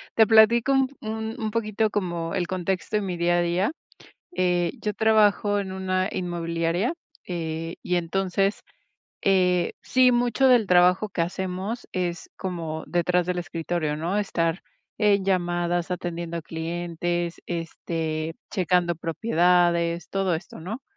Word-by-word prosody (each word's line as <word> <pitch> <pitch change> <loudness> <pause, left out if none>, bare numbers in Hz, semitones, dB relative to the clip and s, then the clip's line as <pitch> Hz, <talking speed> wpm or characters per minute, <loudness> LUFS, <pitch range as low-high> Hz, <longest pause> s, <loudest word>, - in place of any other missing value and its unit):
Te 220 -1 +6
platico 230 +4 +6
un 265 -1 +3
un 220 +1 -4
un 220 - -1
poquito 215 -1 0
como 175 -4 -2
el 180 -2 0
contexto 185 +3 -1
en 210 - -2
mi 180 -2 -3
día 175 0 +2
a - - +3
día. 175 - +1 0.7
Eh, 175 -2 +2
yo 210 -1 -2
trabajo 210 -1 +3
en 195 -2 -3
una 185 0 -1
inmobiliaria, 170 - -1 0.3
eh, 165 -1 -4
y, 180 0 0
entonces, 195 +3 0 0.6
eh, 180 -2 +2
sí, 255 -1 +4
mucho 245 +2 +2
del 245 -4 +5
trabajo 180 +3 +4
que 180 -4 -1
hacemos 190 +6 -4
es 175 -2 -3
como 165 -4 -4
detrás 175 0 +1
del 180 0 -1
escritorio, 165 -1 -2
¿no? 170 +5 -2
Estar 170 -4 0 0.4
en 205 -2 +3
llamadas, 175 -2 0
atendiendo 170 -1 -4
a 165 - -4
clientes, 170 +1 -3
este, 165 -1 -3 0.2
checando 180 -2 +1
propiedades, 170 -1 +1
todo 195 -3 0
esto, 165 -1 -10
¿no? 220 +10 -6
180 Hz, 135 wpm, -25 LUFS, 170-200 Hz, 0.7 s, Te